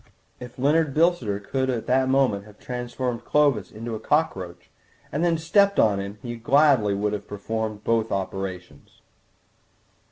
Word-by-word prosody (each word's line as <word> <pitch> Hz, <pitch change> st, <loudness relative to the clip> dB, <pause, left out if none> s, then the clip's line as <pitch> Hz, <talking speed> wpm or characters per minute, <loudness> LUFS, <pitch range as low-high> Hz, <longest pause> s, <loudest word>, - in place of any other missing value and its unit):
If 125 Hz, -1 st, -10 dB
Leonard 145 Hz, +2 st, +2 dB
Bilsiter 155 Hz, -, +2 dB
could 130 Hz, +5 st, -2 dB
at 120 Hz, -3 st, -2 dB
that 130 Hz, +1 st, +2 dB
moment 130 Hz, -7 st, +2 dB
have 105 Hz, -1 st, -16 dB
transformed 125 Hz, -1 st, -4 dB
Clovis 140 Hz, -7 st, +2 dB
into 115 Hz, +2 st, -7 dB
a 110 Hz, -, -4 dB
cockroach 95 Hz, -, -2 dB, 0.4 s
and 150 Hz, +4 st, -1 dB
then 175 Hz, -1 st, +3 dB
have 160 Hz, -1 st, -3 dB
stepped 200 Hz, +4 st, +3 dB
on 105 Hz, -3 st, +3 dB
him 100 Hz, +1 st, -6 dB
he 120 Hz, -1 st, -4 dB
would 115 Hz, -1 st, -11 dB
gladly 130 Hz, -7 st, +4 dB
have 105 Hz, 0 st, -2 dB
performed 110 Hz, +1 st, -4 dB
both 115 Hz, -1 st, 0 dB
operations. 95 Hz, -2 st, -5 dB
115 Hz, 155 wpm, -24 LUFS, 105-140 Hz, 0.4 s, gladly